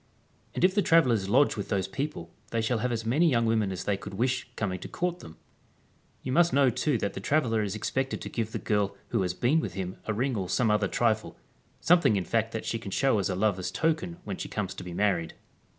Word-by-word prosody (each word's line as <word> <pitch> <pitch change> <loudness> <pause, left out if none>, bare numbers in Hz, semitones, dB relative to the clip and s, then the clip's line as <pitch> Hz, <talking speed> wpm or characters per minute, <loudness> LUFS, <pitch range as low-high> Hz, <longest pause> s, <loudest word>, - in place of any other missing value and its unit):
And - - -1
if 185 0 +5
the 205 - +3
travellers 125 - +3
lodge 135 +7 +4
with 100 - -5
those 95 -3 0
people 145 +9 -5 0.2
they 115 - -1
shall 115 +1 0
have 125 +2 -1
as 115 -1 -2
many 150 +9 +3
young 115 -4 +2
women 110 -3 +1
as 95 -1 -4
they 100 -1 0
could 100 - -8
wish 125 +4 -1
coming 95 -4 -2
to - - -7
court 180 0 -2
them 80 - -12
I - - -35 0.8
You 130 - -3
must 170 +4 +4
know 135 -2 +4
too 140 +3 0
that 100 -2 -2
the - - -5
tra 145 +10 +2
veller 115 -5 0
is 100 0 -3
expected 130 +5 -2
to - - -5
give 110 -2 -3
the - - -3
girl 100 -2 -1
who 115 - +1
has 90 -1 -1
been 135 +10 +2
with - - -4
him 95 -1 -4
a 110 - 0
ring 130 +3 0
or 95 -4 -3
some 115 -4 +2
other 105 -1 +2
trifle, 110 +1 0 0.4
something 165 -10 +4
in 95 -3 -1
fact 115 -1 0
that 115 - -4
she 115 - -2
can 110 - -7
show 115 +2 +2
as 100 - 0
a 95 - -1
lover's 95 -2 0
token 165 +2 -1
when 190 - -5
she - - -6
comes 95 -3 -3
to - - -8
be 90 -1 -7
married. 90 -5 0
115 Hz, 250 wpm, -28 LUFS, 100-135 Hz, 0.8 s, if